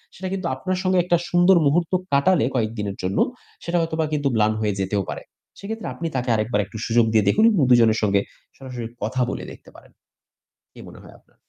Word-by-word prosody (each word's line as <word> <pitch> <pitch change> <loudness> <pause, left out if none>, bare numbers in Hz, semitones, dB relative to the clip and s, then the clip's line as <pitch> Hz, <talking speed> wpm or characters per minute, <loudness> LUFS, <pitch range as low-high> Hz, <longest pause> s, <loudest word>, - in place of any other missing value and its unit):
সেটা 190 - -6
কিন্তু 190 -2 -3
আপনার 185 +7 -3
সঙ্গে 185 0 +2
একটা 175 0 +2
সুন্দর 175 +2 +5
মুহূর্ত 165 +5 +1 0.2
কাটালে 140 +2 +3
কয়েকদিনের 110 -4 -2
জন্য 95 +2 -2 0.5
সেটা 170 +1 -1
হয়তোবা 160 -1 -1
কিন্তু 145 -2 0
ম্লান 110 0 +2
হয়ে 105 -1 0
যেতেও 100 +1 -1
পারে। - - -6 0.4
সেক্ষেত্রে 220 +2 -6
আপনি 165 +6 -4
তাকে 125 -1 -2
আরেকবার 110 0 0
একটু 110 - -10
সুযোগ 115 0 +3
দিয়ে 110 - +4
দেখুন 215 - +3
এবং 200 -8 +1
২ 125 - +7
জনের 110 -1 +3
সঙ্গে 100 -1 +2 0.4
সরাসরি 125 -3 -7 0.2
কথা 125 +4 -1
বলে - - -5
দেখতে - - -15
পারেন। - - -17 0.8
কি - - -15
মনে - - -13
হয় - - -15
আপনার? - - -34
130 Hz, 200 wpm, -22 LUFS, 110-175 Hz, 0.8 s, ২